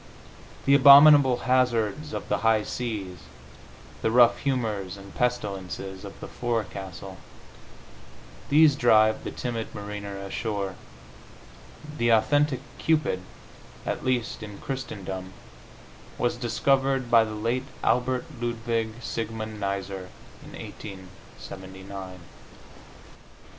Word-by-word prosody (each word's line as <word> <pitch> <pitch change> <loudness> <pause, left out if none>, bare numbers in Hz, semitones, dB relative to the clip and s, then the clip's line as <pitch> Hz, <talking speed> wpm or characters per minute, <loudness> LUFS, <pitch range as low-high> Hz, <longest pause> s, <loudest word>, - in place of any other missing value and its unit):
The 140 - +5
abominable 140 -2 +8
hazards 125 +2 +1
of - - -5
the - - 0
high 110 -1 +3
seas, 105 -9 -4 0.8
the - - +1
rough 120 0 +5
humors 110 -9 -2
and 100 0 -12
pestilences 100 -5 -3
of 100 - -10
the - - -6
forecastle 95 -5 -4 1.3
these 150 0 +6
drive 110 -4 +4
the - - -4
timid 115 -2 -5
mariner 100 -1 -6
ashore.... 100 0 -3 1.3
The 120 - +2
authentic 140 +4 +3 0.2
Cupid, 155 -12 +1 0.6
at - - -3
least 125 -3 -1
in 105 -2 -8
Christendom, 95 -8 -6 0.8
was - - 0
discovered 135 -2 +1
by 115 -1 +7
the 110 -1 -5
late 115 +5 -1 0.2
Albert 125 +2 +1 0.2
Ludwig 115 -1 -2
Siegmund 110 -2 -4
Neisser 100 -2 -4 0.3
in - - -13
1879. 95 0 -10
110 Hz, 100 wpm, -26 LUFS, 100-125 Hz, 1.3 s, abominable